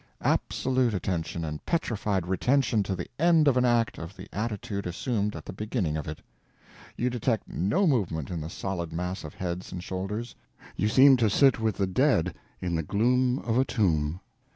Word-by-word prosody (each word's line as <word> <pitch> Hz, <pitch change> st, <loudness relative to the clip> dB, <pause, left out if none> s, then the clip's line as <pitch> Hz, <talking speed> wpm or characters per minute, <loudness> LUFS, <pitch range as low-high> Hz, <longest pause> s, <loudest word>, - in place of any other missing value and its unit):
Absolute 130 Hz, -4 st, +1 dB
attention 85 Hz, -3 st, -2 dB
and 75 Hz, -1 st, -5 dB
petrified 105 Hz, -, -1 dB
retention 115 Hz, +5 st, +2 dB
to 95 Hz, -1 st, -2 dB
the 85 Hz, -, -4 dB
end 165 Hz, -2 st, +5 dB
of 135 Hz, -, +5 dB
an 125 Hz, 0 st, +3 dB
act 120 Hz, -2 st, +2 dB
of 85 Hz, +4 st, -8 dB
the 95 Hz, +1 st, -9 dB
attitude 105 Hz, -2 st, -3 dB
assumed 105 Hz, +3 st, -1 dB
at -, -, -8 dB
the -, -, -7 dB
beginning 105 Hz, -, -2 dB
of 75 Hz, -3 st, -4 dB
it. 75 Hz, 0 st, -7 dB, 0.7 s
You 125 Hz, +1 st, 0 dB
detect 120 Hz, -2 st, -1 dB
no 150 Hz, -, +1 dB
movement 90 Hz, -, 0 dB
in 85 Hz, -3 st, -3 dB
the 80 Hz, -, -5 dB
solid 90 Hz, -3 st, -4 dB
mass 90 Hz, +3 st, -3 dB
of 75 Hz, -, -8 dB
heads 90 Hz, 0 st, -4 dB
and 90 Hz, -1 st, -6 dB
shoulders. 105 Hz, +6 st, -4 dB, 0.4 s
You 105 Hz, -, +1 dB
seem 130 Hz, +4 st, +7 dB
to 115 Hz, -3 st, +3 dB
sit 135 Hz, +4 st, +4 dB
with 110 Hz, -3 st, 0 dB
the 100 Hz, -, +2 dB
dead 95 Hz, -, +2 dB, 0.3 s
in 90 Hz, -2 st, -2 dB
the 80 Hz, -, +1 dB
gloom 125 Hz, -, +2 dB
of 115 Hz, +1 st, +2 dB
a -, -, +5 dB
tomb. 85 Hz, -, 0 dB
100 Hz, 185 wpm, -27 LUFS, 90-125 Hz, 0.7 s, seem